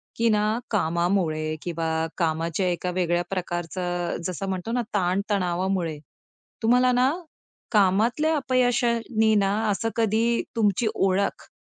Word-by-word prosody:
की 230 Hz, 0 st, +2 dB
ना 215 Hz, +1 st, +1 dB
कामामुळे 170 Hz, -4 st, 0 dB
किंवा 165 Hz, -2 st, -3 dB, 0.3 s
कामाच्या 165 Hz, +2 st, 0 dB
एका 180 Hz, 0 st, -1 dB
वेगळ्या 175 Hz, -1 st, 0 dB
प्रकारचं 175 Hz, -1 st, -3 dB
जसं 185 Hz, +2 st, -4 dB
म्हणतो 190 Hz, +4 st, -3 dB
ना 245 Hz, -, +1 dB
ताणतणावामुळे, 185 Hz, -3 st, 0 dB, 0.7 s
तुम्हाला 250 Hz, +2 st, +4 dB
ना, 250 Hz, +2 st, +3 dB, 0.6 s
कामातल्या 225 Hz, +10 st, +3 dB
अपयशांनी 240 Hz, -4 st, +1 dB
ना 195 Hz, -1 st, +2 dB, 0.2 s
असं 225 Hz, +3 st, -1 dB
कधी 230 Hz, +1 st, +2 dB
तुमची 220 Hz, 0 st, +2 dB
ओळख, 195 Hz, +1 st, 0 dB
195 Hz, 110 wpm, -25 LUFS, 175-225 Hz, 0.7 s, तुम्हाला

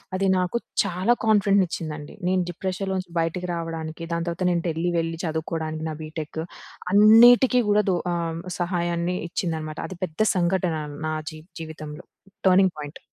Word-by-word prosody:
అది 195 Hz, +1 st, +1 dB
నాకు 180 Hz, +5 st, 0 dB, 0.3 s
చాలా 190 Hz, +3 st, +1 dB
కాన్ఫిడెంట్‌ని 200 Hz, -3 st, +4 dB
ఇచ్చిందండి. 155 Hz, -3 st, -6 dB
నేను 185 Hz, 0 st, +2 dB
డిప్రెషన్‌లో 190 Hz, +2 st, -3 dB
నుంచి 185 Hz, -2 st, -6 dB
బయటికి 165 Hz, +2 st, -1 dB
రావడానికి, 165 Hz, -1 st, -5 dB
దాని 170 Hz, 0 st, -1 dB
తర్వాత 170 Hz, +2 st, -2 dB
నేను 170 Hz, -1 st, 0 dB
ఢిల్లీ 165 Hz, +2 st, -1 dB
వెళ్ళి 165 Hz, 0 st, -2 dB
చదువుకోడానికి 160 Hz, 0 st, -3 dB
నా 155 Hz, -, -4 dB
బీటెక్ 155 Hz, 0 st, -6 dB, 0.5 s
అన్నిటికీ 240 Hz, +4 st, +7 dB
గూడా 210 Hz, +1 st, +4 dB
దూ 180 Hz, -, +2 dB, 0.2 s
ఆహ్, 165 Hz, -1 st, -2 dB, 0.2 s
సహాయాన్ని 175 Hz, 0 st, -1 dB
ఇచ్చిందనమాట. 160 Hz, -3 st, -3 dB
అది 185 Hz, -, -8 dB
పెద్ద 160 Hz, -3 st, -15 dB, 0.2 s
సంఘటన 180 Hz, -1 st, +1 dB, 0.3 s
నా 155 Hz, -, -1 dB, 0.2 s
జీ 155 Hz, -, -10 dB, 0.2 s
జీవితంలో. 155 Hz, -1 st, -8 dB, 0.4 s
Turning 190 Hz, 0 st, +5 dB
point. 145 Hz, +1 st, -7 dB
170 Hz, 145 wpm, -24 LUFS, 160-185 Hz, 0.5 s, అన్నిటికీ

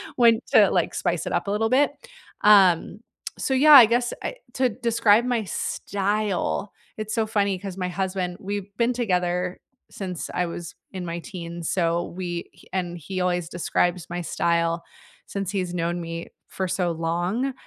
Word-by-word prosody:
when 230 Hz, -2 st, +5 dB
to, -, -, +7 dB
like, -, -, +1 dB
spice -, -, -1 dB
it -, -, -3 dB
up -, -, -1 dB
a -, -, 0 dB
little 220 Hz, +2 st, +1 dB
bit. 275 Hz, +4 st, +4 dB, 0.5 s
Um, 200 Hz, -1 st, +5 dB, 0.4 s
so 265 Hz, -, -1 dB
yeah, 295 Hz, +4 st, +7 dB
I 260 Hz, -5 st, +12 dB
guess 240 Hz, +2 st, +1 dB
I -, -, -3 dB, 0.2 s
to 255 Hz, -1 st, +2 dB
describe 230 Hz, -1 st, +3 dB
my 245 Hz, -3 st, 0 dB
style, 200 Hz, 0 st, -2 dB, 0.3 s
it's 215 Hz, 0 st, -4 dB
so 225 Hz, -2 st, +1 dB
funny 200 Hz, -3 st, 0 dB
'cause 195 Hz, -1 st, -6 dB
my 180 Hz, -1 st, -2 dB
husband, 185 Hz, -1 st, -2 dB
we've 200 Hz, 0 st, -5 dB
been 240 Hz, +1 st, +2 dB
together 180 Hz, -5 st, -1 dB, 0.3 s
since 180 Hz, -4 st, -5 dB
I 180 Hz, -, 0 dB
was 170 Hz, -1 st, -6 dB, 0.2 s
in 185 Hz, -2 st, -5 dB
my 170 Hz, 0 st, -4 dB
teens, 170 Hz, -2 st, -6 dB
so 170 Hz, -1 st, +1 dB
we, 175 Hz, -2 st, -4 dB
h -, -, -20 dB
and 175 Hz, -2 st, -2 dB
he 185 Hz, +4 st, -5 dB
always 180 Hz, -2 st, 0 dB
describes 175 Hz, 0 st, 0 dB
my 175 Hz, 0 st, -3 dB
style 170 Hz, 0 st, 0 dB, 0.4 s
since 195 Hz, -2 st, -3 dB
he's 185 Hz, -3 st, -2 dB
known 170 Hz, 0 st, -1 dB
me 165 Hz, 0 st, -5 dB, 0.2 s
for 190 Hz, -, -3 dB
so 175 Hz, -1 st, 0 dB
long. 175 Hz, +11 st, -1 dB
185 Hz, 170 wpm, -24 LUFS, 175-215 Hz, 0.5 s, I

